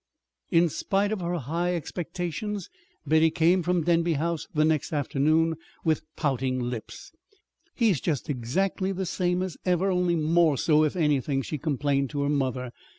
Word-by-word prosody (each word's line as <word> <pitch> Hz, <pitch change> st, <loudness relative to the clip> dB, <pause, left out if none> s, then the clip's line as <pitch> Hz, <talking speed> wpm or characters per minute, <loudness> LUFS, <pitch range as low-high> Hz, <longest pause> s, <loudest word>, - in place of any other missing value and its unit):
In 170 Hz, +1 st, +4 dB
spite 195 Hz, +6 st, 0 dB
of 215 Hz, -4 st, -2 dB
her 175 Hz, 0 st, -1 dB
high 170 Hz, +5 st, -1 dB
expectations, 180 Hz, +4 st, -4 dB, 0.3 s
Betty 160 Hz, +2 st, +4 dB
came 170 Hz, +3 st, +3 dB
from 175 Hz, 0 st, +1 dB
Denby 170 Hz, 0 st, +2 dB
House 165 Hz, +2 st, -2 dB
the 155 Hz, -1 st, +2 dB
next 155 Hz, -3 st, 0 dB
afternoon 155 Hz, +3 st, +1 dB, 0.3 s
with 160 Hz, -2 st, +2 dB
pouting 130 Hz, -3 st, 0 dB
lips. 120 Hz, -2 st, -6 dB, 0.6 s
"He's 215 Hz, -, +2 dB
just 150 Hz, -6 st, -1 dB
exactly 180 Hz, +9 st, -1 dB
the 190 Hz, 0 st, -3 dB
same 180 Hz, +1 st, 0 dB
as 185 Hz, -3 st, -5 dB
ever, 180 Hz, +1 st, +1 dB
only 180 Hz, -1 st, +1 dB
more 160 Hz, -1 st, +3 dB
so, 155 Hz, +1 st, +3 dB
if 155 Hz, -, 0 dB
anything," 145 Hz, -4 st, +1 dB
she 150 Hz, -, -4 dB
complained 140 Hz, -2 st, 0 dB
to 145 Hz, -1 st, -2 dB
her 140 Hz, -, 0 dB
mother. 130 Hz, -3 st, -1 dB
160 Hz, 155 wpm, -26 LUFS, 145-180 Hz, 0.6 s, In